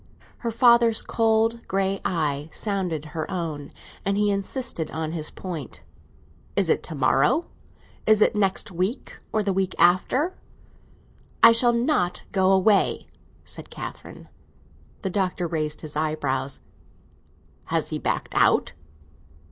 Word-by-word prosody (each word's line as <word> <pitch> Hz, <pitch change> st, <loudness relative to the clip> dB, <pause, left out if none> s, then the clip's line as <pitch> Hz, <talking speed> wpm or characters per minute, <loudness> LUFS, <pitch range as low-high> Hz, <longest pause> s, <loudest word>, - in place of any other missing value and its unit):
Her 235 Hz, -, -2 dB
father's 235 Hz, -1 st, +4 dB
cold 225 Hz, 0 st, +1 dB
grey 195 Hz, 0 st, 0 dB
eye 150 Hz, -3 st, -1 dB
sounded 185 Hz, -7 st, -2 dB
her 160 Hz, -2 st, -3 dB
own, 160 Hz, -6 st, -4 dB, 0.3 s
and 200 Hz, 0 st, 0 dB
he 205 Hz, 0 st, +2 dB
insisted 200 Hz, -, -3 dB
on 160 Hz, 0 st, -4 dB
his 160 Hz, -2 st, -3 dB
point. 145 Hz, -, -7 dB, 0.7 s
"Is 195 Hz, -5 st, +2 dB
it -, -, +1 dB
to 160 Hz, -, -7 dB
morrow? 140 Hz, -, +2 dB, 0.6 s
Is 215 Hz, -1 st, +5 dB
it 210 Hz, -, +4 dB
next 200 Hz, +1 st, 0 dB
week, 185 Hz, +8 st, -3 dB
or 215 Hz, -, +1 dB
the 195 Hz, -1 st, 0 dB
week 190 Hz, 0 st, -1 dB
after?" 195 Hz, -, +3 dB, 1.1 s
"I -, -, +11 dB
shall 240 Hz, +1 st, +4 dB
not 235 Hz, -, +1 dB
go 190 Hz, -1 st, +3 dB
away!" 195 Hz, +1 st, +3 dB, 0.4 s
said -, -, -8 dB
Catherine. -, -, -9 dB, 0.8 s
The 190 Hz, -, -1 dB
Doctor 185 Hz, -2 st, -1 dB
raised 155 Hz, -2 st, -2 dB
his 150 Hz, -1 st, -6 dB
eyebrows. 140 Hz, -4 st, -2 dB, 1.0 s
"Has -, -, -1 dB
he -, -, -2 dB
backed -, -, -2 dB
out?" -, -, +3 dB
190 Hz, 130 wpm, -24 LUFS, 160-220 Hz, 1.1 s, I